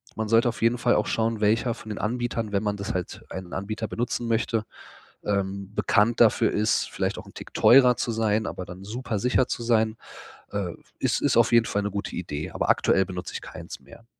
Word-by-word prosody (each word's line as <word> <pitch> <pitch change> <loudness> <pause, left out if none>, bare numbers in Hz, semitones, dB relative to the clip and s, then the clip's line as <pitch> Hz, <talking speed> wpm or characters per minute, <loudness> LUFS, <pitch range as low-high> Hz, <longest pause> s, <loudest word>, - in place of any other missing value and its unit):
Man 110 -1 -2
sollte 115 +2 +4
auf 115 - -6
jeden 115 +2 +3
Fall 120 0 +3
auch 105 - +1
schauen, 115 0 0
welcher 110 +3 +2
von 110 - -11
den 105 - -4
Anbietern, 115 -1 -2
wenn 100 0 0
man 105 -1 0
das 100 - -4
halt 90 -2 -4
einen 95 -2 -7
Anbieter 110 +3 -3
benutzen 120 +1 -2
möchte, 115 -1 0 0.6
ähm, 100 -1 -2
bekannt 110 +2 +2
dafür 115 -1 +5
ist, 110 +1 +1
vielleicht - - -2
auch - - -9
'n - - -15
Tick - - -10
teurer 125 -1 +6
zu 120 - -2
sein, 110 -1 +1
aber 90 - -5
dann 90 +1 -10
super 115 +1 -3
sicher 125 +3 +2
zu - - -3
sein. 110 -1 +2 0.6
Äh, 95 -4 -2 0.3
ist - - +1
ist - - +2
auf - - +5
jeden 115 -1 +5
Fall 100 - -1
'ne 105 - -2
gute 100 0 -4
Idee, 80 -4 -4
aber - - -2
aktuell 95 - +3
benutze 90 -2 -6
ich - - -3
keins - - -9
mehr. 115 - -16
110 Hz, 215 wpm, -25 LUFS, 100-115 Hz, 0.6 s, teurer